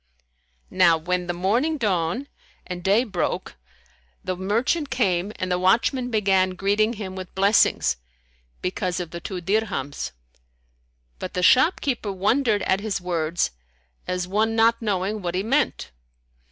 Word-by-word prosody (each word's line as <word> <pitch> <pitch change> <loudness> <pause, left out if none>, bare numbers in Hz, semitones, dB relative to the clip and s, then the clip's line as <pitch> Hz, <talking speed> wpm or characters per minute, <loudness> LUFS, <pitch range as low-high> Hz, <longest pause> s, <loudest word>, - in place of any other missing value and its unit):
Now 175 -3 +5
when 180 +2 -2
the - - 0
morning 225 - 0
dawned 205 - -1 0.4
and 180 -1 -6
day 200 +5 +4
broke 195 -8 -3 0.7
the 185 - -2
merchant 230 - 0
came 200 -7 0
and 185 0 -3
the 180 - +1
watchman 235 +7 +2
began 195 -4 +2
greeting 205 +4 +1
him 195 -4 -6
with 185 -1 -8
blessings, 200 +2 +3 0.7
because 180 -1 -2
of 175 -2 -5
the 170 - -6
two 185 0 -5
dirhams; 185 - -2 1.1
but - - -6
the 180 - 0
shop 260 - +5
keeper 240 -7 -2
wondered 210 +3 +1
at 190 - +1
his 205 -1 -2
words 170 -2 -1 0.6
as 180 -1 -2
one 215 +4 +1
not 230 +1 +3
knowing 205 0 -1
what 175 -1 -3
he 190 - 0
meant. 270 +6 0
195 Hz, 140 wpm, -24 LUFS, 180-225 Hz, 1.1 s, Now